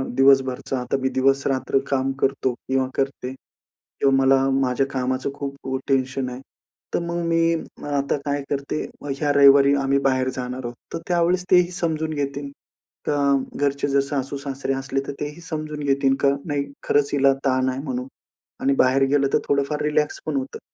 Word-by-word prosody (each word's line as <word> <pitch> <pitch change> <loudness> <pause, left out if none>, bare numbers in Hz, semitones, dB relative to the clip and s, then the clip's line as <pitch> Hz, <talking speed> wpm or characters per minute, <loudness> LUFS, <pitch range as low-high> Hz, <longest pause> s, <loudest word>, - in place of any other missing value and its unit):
दिवसभरचा. 135 -1 +3
आता 125 +2 -1
मी 130 - +1
दिवसरात्र 135 0 +2
काम 135 -1 +1
करतो 130 -1 +1
किंवा 130 +1 -1
करते, 135 -1 -2 0.7
किंवा 135 -1 +4
मला 135 0 +4 0.2
माझ्या 130 0 +1
कामाचं 130 +1 -1
खूप 140 -1 -5
खू 130 0 -2
टेन्शन 130 -1 0
आहे. 125 +1 -8 0.5
तर - - +2
मग 170 0 -2
मी 165 0 +3
मग 160 - -8
आता 140 +1 0
काय 145 0 -1
करते? 140 +2 -2 0.2
मग 145 - -3
ह्या 145 0 +1
रविवारी 140 0 +7
आम्ही 135 +1 +2
बाहेर 130 0 +1
जाणार 125 0 -5
आहोत, 120 0 -5 0.2
तर - - -2
त्यावेळेस 175 +1 +2
तेही 180 -1 +5
समजून 160 -3 -2
घेतील 140 -1 -3 0.6
का 145 - +1 0.4
घरचे, 140 0 0
जर 140 0 +2
सासू-सासरे 135 -1 -3
असले, 135 0 -2
तर - - -3
तेही 150 +3 -5
समजून 155 -2 -5
घेतील 135 -1 +2
का? 140 - +5 0.2
नाही, 140 -2 -2
खरंच 145 -1 +2
हिला 140 -1 +4
ताण 130 0 +2
आहे 130 - -3
म्हणून 130 -2 -3 0.5
आणि 135 +1 +3
बाहेर 130 +1 +3
गेलं 140 -1 +3
तर - - +4
थोडं 140 0 +3
फार 150 - -2
रिलॅक्स 150 0 0
पण 155 -2 -2
होतं. 135 0 -4
140 Hz, 175 wpm, -23 LUFS, 130-145 Hz, 0.7 s, रविवारी